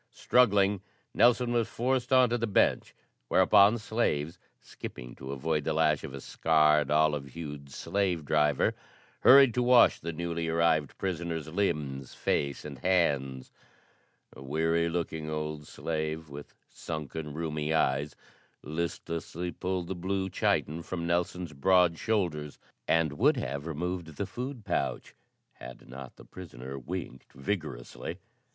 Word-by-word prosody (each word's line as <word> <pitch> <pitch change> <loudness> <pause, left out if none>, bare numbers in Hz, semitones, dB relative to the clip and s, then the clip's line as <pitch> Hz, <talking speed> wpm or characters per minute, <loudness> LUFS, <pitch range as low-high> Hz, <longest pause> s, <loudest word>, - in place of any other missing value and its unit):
Struggling, 100 -5 +3 0.3
Nelson 120 +1 +4
was 115 -2 +1
forced 125 +2 -1
on 130 -2 +5
to 120 - +2
the 115 - 0
bench, 100 - +1 0.3
whereupon 100 - +5
slaves, 90 -9 -1 0.2
skipping - - -9
to 65 0 -7
avoid 75 +2 -1
the - - -1
lash 75 -2 +2
of 80 - -6
a - - -6
scarred, 75 -1 +3
olive 75 -2 +2
hued 75 -3 -7
slave 90 +1 -1
driver, 75 -2 +2 0.5
hurried 135 -2 +7
to 125 - +1
wash 125 -1 +5
the 85 - -4
newly 85 0 -3
arrived 80 -3 +1
prisoner's 85 -4 -3
limbs, 75 -8 -2
face 70 0 -1
and 70 -3 -8
hands. 70 -8 0 0.8
A - - -12
weary 80 +4 +1
looking 80 -2 -3
old 75 -1 -4
slave 80 -1 -4
with 70 +1 -10
sunken, 75 -1 -6
rheumy 75 -1 -2
eyes 75 -1 +1 0.5
listlessly 85 +2 -4
pulled 90 -1 -3
the 95 - -3
blue 95 +1 -2
chiton 80 +3 0
from 85 0 -5
Nelson's 85 -1 -1
broad 85 +3 +3
shoulders, 85 -9 -1 0.3
and 80 -3 +2
would - - +4
have 70 +4 -4
removed 85 +2 -3
the 100 - -1
food 125 +3 -6
pouch - - -2 0.4
had 60 -1 -11
not 65 +1 -10
the - - -15
prisoner 70 -7 -9
winked 70 -2 -7
vigorously. 70 -5 -5
80 Hz, 135 wpm, -29 LUFS, 75-95 Hz, 0.8 s, hurried